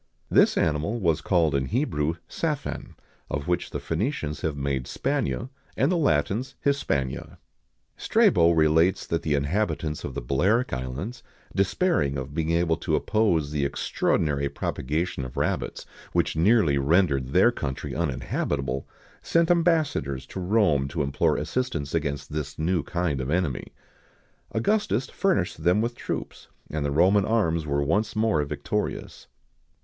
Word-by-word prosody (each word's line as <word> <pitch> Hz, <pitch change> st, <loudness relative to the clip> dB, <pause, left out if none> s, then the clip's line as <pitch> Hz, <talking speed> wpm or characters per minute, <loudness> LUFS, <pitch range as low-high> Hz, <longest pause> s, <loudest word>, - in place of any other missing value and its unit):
This -, -, +5 dB
animal 80 Hz, +8 st, 0 dB
was 85 Hz, -6 st, +1 dB
called 85 Hz, -5 st, +2 dB
in 65 Hz, -1 st, 0 dB
Hebrew, 80 Hz, -, 0 dB
Saphan, 150 Hz, -4 st, -3 dB, 0.3 s
of 75 Hz, 0 st, -3 dB
which 90 Hz, 0 st, 0 dB
the -, -, -4 dB
Phœnicians 80 Hz, -, -2 dB
have 80 Hz, -3 st, -2 dB
made 70 Hz, -2 st, -1 dB
Spania, 65 Hz, -, -2 dB, 0.3 s
and 135 Hz, +6 st, +3 dB
the -, -, +2 dB
Latins 125 Hz, -, +1 dB
Hispania.[XIX 70 Hz, -, 0 dB
104] -, -, -17 dB, 0.6 s
Strabo 85 Hz, -1 st, +4 dB
relates 80 Hz, +2 st, +3 dB
that 85 Hz, -, -1 dB
the 75 Hz, -2 st, 0 dB
inhabitants 75 Hz, +1 st, -1 dB
of -, -, -5 dB
the -, -, -3 dB
Balearic 95 Hz, -, +1 dB
Islands, 65 Hz, -, -4 dB, 0.3 s
despairing 100 Hz, -, +1 dB
of 65 Hz, +2 st, -5 dB
being 80 Hz, 0 st, -1 dB
able 85 Hz, -1 st, +2 dB
to -, -, 0 dB
oppose 85 Hz, -10 st, +1 dB
the 75 Hz, -2 st, -1 dB
extraordinary 70 Hz, 0 st, 0 dB
propagation 75 Hz, +3 st, -2 dB
of 65 Hz, -1 st, -8 dB
rabbits, -, -, -2 dB, 0.3 s
which -, -, +1 dB
nearly 85 Hz, -5 st, +4 dB
rendered 70 Hz, -3 st, +2 dB
their 65 Hz, -, +4 dB
country 65 Hz, -, -4 dB
uninhabitable, 70 Hz, -3 st, -2 dB, 0.3 s
sent 170 Hz, +1 st, +2 dB
ambassadors 155 Hz, -, +1 dB
to 95 Hz, -, -7 dB
Rome 90 Hz, -8 st, +2 dB
to 75 Hz, +1 st, -2 dB
implore 70 Hz, -1 st, +1 dB
assistance 125 Hz, -, -2 dB
against 70 Hz, -3 st, -2 dB
this 75 Hz, -2 st, -4 dB
new 85 Hz, +2 st, +1 dB
kind 85 Hz, -6 st, -2 dB
of 65 Hz, -, -4 dB
enemy.[XIX 80 Hz, -5 st, -1 dB, 0.8 s
105] -, -, -5 dB
Augustus 135 Hz, -, +1 dB
furnished 95 Hz, -, 0 dB
them 90 Hz, +4 st, +4 dB
with 115 Hz, +2 st, 0 dB
troops, -, -, -6 dB, 0.2 s
and 75 Hz, -1 st, -2 dB
the 70 Hz, -, 0 dB
Roman 90 Hz, +7 st, +4 dB
arms 85 Hz, -8 st, +1 dB
were 70 Hz, 0 st, +1 dB
once 105 Hz, +10 st, 0 dB
more 110 Hz, -8 st, +2 dB
victorious. 70 Hz, -, -4 dB
80 Hz, 145 wpm, -26 LUFS, 70-105 Hz, 0.8 s, This